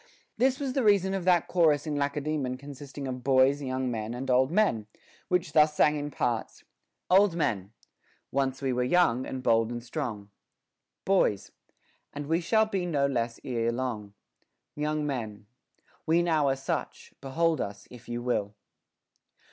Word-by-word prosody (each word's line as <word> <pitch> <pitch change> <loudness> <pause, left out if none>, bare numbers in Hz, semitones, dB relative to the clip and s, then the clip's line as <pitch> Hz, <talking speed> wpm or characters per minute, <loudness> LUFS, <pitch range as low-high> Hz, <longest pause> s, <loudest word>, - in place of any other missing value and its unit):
This 260 +1 +2
was 275 -3 -2
the 270 - +1
reason 195 -3 +3
of 190 -2 -3
that 180 -2 +3
chorus 155 -5 +3
in 150 -2 -2
Lace 140 +1 -1
daemon 140 -4 -2
consisting 140 0 -8
of 125 -1 -5
boys, 135 +2 +4
young 130 -1 -2
men, 110 0 -4
and 130 +1 -3
old 130 +1 +4
men, 165 - +1 0.4
which 180 -5 0
thus 150 0 +5
sang 150 0 +4
in 145 0 -3
parts: 120 -5 -2 0.2
— - - -55
Old 190 -1 +5
Men. 100 - -1 0.6
Once 135 0 -1
we 130 -1 +1
were 125 - 0
young, 130 -4 +2
and 130 -1 -5
bold 115 -2 +3
and 120 -1 -5
strong. 120 -7 -5 0.7
Boys. 185 - +1 0.6
And 145 0 -5
we 165 +4 +1
shall 220 +6 +3
be 195 -4 -2
no 145 -5 +1
less 120 -4 -1
ere 115 -2 -1
long. 115 -5 -4 0.6
Young 150 0 -1
Men. 110 -7 -4 0.6
We 165 +2 +3
now 160 -4 +2
are 135 - +1
such; 135 - -4
behold 160 +2 0
us, 100 0 -6
if 125 -1 -13
you 120 0 -4
will. 105 -4 -1
140 Hz, 165 wpm, -28 LUFS, 120-160 Hz, 0.7 s, thus